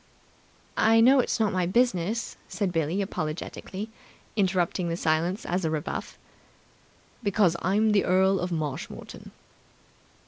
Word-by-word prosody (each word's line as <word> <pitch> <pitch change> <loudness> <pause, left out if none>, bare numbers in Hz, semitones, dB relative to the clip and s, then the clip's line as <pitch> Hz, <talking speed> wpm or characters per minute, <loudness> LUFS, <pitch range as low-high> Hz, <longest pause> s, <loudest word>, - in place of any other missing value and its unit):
"I 225 +1 +5
know 260 +4 +6
it's 245 - 0
not 215 -3 +2
my 180 -2 +1
business," 225 0 +1
said 200 -4 -2
Billie 165 +4 0
apologetically, 190 +4 -5 0.4
interpreting 185 -3 +1
the 165 - -2
silence 170 +6 0
as 180 +2 -1
a 160 - +1
rebuff. 155 -2 -4 1.0
"Because 200 -5 +2
I'm 210 +4 +2
the 205 -1 +3
Earl 190 +1 +3
of 180 0 -3
Marshmoreton." 150 -5 -5
185 Hz, 125 wpm, -27 LUFS, 170-210 Hz, 1.0 s, know